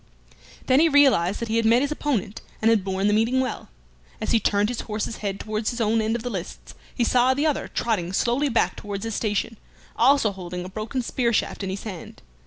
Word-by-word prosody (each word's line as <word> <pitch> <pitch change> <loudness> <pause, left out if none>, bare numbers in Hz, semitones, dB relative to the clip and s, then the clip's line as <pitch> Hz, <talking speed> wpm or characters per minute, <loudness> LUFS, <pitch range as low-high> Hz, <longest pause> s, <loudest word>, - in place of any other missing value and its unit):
Then 260 +1 +4
he 330 +1 +5
realized 260 - +4
that 235 - -3
he 225 +1 0
had 230 - +1
met 235 +4 +4
his 285 - -2
opponent, 250 -9 -2 0.2
and 225 +1 +3
had 215 -4 +2
borne 190 0 -2
the 210 - +3
meeting 225 +4 +2
well. 255 -3 -3 0.5
As - - -3
he 230 - +4
turned 205 0 +1
his 245 - -3
horse's 215 +1 -4
head 200 -2 -4
towards 215 0 -2
his 240 - -5
own 225 0 +2
end 220 +1 0
of 235 - -4
the 245 - -3
lists, 185 -4 -7 0.2
he 245 - +1
saw 250 +2 +3
the 290 +3 0
other 300 -3 0
trotting 200 -7 -1
slowly 245 +8 +1
back 235 - +1
towards 200 -2 -6
his 225 - -3
station, 215 +1 -2 0.4
also 275 -6 +4
holding 180 -2 -6
a - - -7
broken 220 +6 -4
spear 235 0 0
shaft 215 - -1
in 195 - -3
his 190 +1 -5
hand. 190 -6 -9
225 Hz, 225 wpm, -24 LUFS, 200-245 Hz, 0.5 s, he